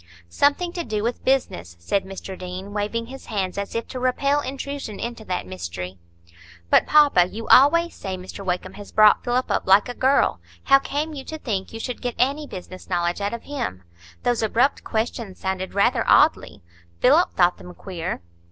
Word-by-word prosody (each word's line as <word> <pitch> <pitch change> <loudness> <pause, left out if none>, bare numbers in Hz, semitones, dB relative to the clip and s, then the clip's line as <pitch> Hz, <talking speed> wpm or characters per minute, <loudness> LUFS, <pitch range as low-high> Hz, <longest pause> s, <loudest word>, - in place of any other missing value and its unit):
"Something 290 - +1
to 345 - -3
do 215 -6 -3
with 235 +1 -2
business," 90 - 0
said 190 - -1
Mr 190 0 -7
Deane, 185 +2 -7
waving 210 +3 -2
his 265 +3 -11
hands, 195 -4 -2
as 200 +2 -5
if 230 - -2
to 255 - -5
repel 275 +3 +1
intrusion 275 -4 -5
into 235 -2 -5
that 180 - -3
mystery. 90 0 -6 0.7
"But, - - +5
papa, 285 -13 +5
you 220 +4 -7
always 335 +6 +6
say 190 -1 -5
Mr 185 +2 -9
Wakem 180 -1 -3
has 205 - -11
brought 215 -1 +5
Philip 245 +1 0
up - - -1
like 195 +4 +6
a 245 - -4
girl; 265 +3 +2 0.2
how 275 0 +6
came 295 +3 -3
you 275 -2 -7
to 315 - -6
think 205 -10 -3
you 225 - -7
should 245 +1 -5
get 245 -1 -3
any 280 +4 +1
business 185 -2 -10
knowledge 175 +1 0
out 205 +3 -1
of 235 - -10
him? 245 - -4 0.4
Those 245 -2 +1
abrupt 235 +5 +1
questions 220 -3 -3
sounded 190 0 -3
rather 230 +4 +3
oddly. 295 - +3 0.4
Philip 310 +8 +4
thought 175 -1 +3
them 180 - -10
queer." 180 - -5
220 Hz, 185 wpm, -23 LUFS, 185-270 Hz, 0.7 s, always